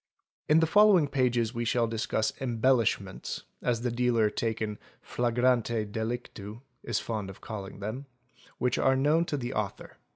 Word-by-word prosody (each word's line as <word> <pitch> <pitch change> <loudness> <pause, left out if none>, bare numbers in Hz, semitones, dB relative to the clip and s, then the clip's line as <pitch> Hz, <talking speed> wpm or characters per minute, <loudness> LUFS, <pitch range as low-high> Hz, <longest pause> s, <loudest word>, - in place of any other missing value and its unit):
In 155 +2 +6
the - - +5
following 195 -2 +5
pages 125 -4 +1
we 120 0 -2
shall 120 0 +2
discuss 110 -1 -1
"embellishments'', 115 -6 0 0.2
as 120 -2 0
the 125 0 -1
dealer 120 -3 +2
taken 110 -2 -2 0.2
flagrante 120 -2 +1
delictu 110 0 -5 0.2
is 120 -3 -1
fond 105 -4 -4
of 95 - -10
calling 100 -3 -7
them, 120 +7 -5 0.5
which 125 -1 0
are 135 - +4
known 150 +5 +3
to 150 - -2
the 125 -1 -4
author. 105 -2 -4
120 Hz, 150 wpm, -29 LUFS, 110-130 Hz, 0.5 s, In